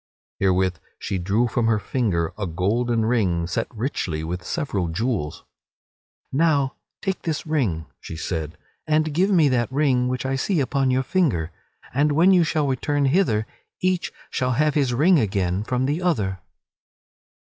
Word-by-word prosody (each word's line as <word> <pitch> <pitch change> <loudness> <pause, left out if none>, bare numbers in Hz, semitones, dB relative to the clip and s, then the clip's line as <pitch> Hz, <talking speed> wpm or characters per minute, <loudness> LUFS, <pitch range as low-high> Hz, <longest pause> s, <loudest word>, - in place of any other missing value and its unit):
(Herewith 95 -2 +2 0.2
she 95 - -3
drew 105 +7 +1
from 120 -1 0
her 115 -1 +3
finger 100 -8 -1
a 105 -3 -3
golden 110 +7 0
ring 95 -8 +1
set 90 - -2
very 110 - -14
richly 85 - -2
with 90 +2 -4
several 105 - -2
jewels.) 95 - -2 0.9
"Now 140 -2 +2 0.3
take 190 -2 -2
this 160 -3 -3
ring," 115 - 0
she - - -8
said, 80 -1 -4 0.3
"and 155 0 +2
give 185 +6 +2
me 170 -7 +5
that 120 -2 0
ring 130 -3 +2
which 125 +1 -2
I 135 0 0
see 175 +5 0
upon 135 0 +1
your 130 +1 +2
finger, 130 - 0 0.4
and 145 +3 +2
when 170 +6 +5
you 180 -2 +5
shall 155 -2 0
return 140 +1 0
hither 130 - +2 0.3
each 185 -1 0 0.2
shall 125 0 0
have 150 +4 +2
his 140 -4 +1
ring 155 +8 +4
again 95 -3 0
from 125 +3 -1
the 150 +6 -1
other." 105 - 0
125 Hz, 160 wpm, -23 LUFS, 95-150 Hz, 0.9 s, me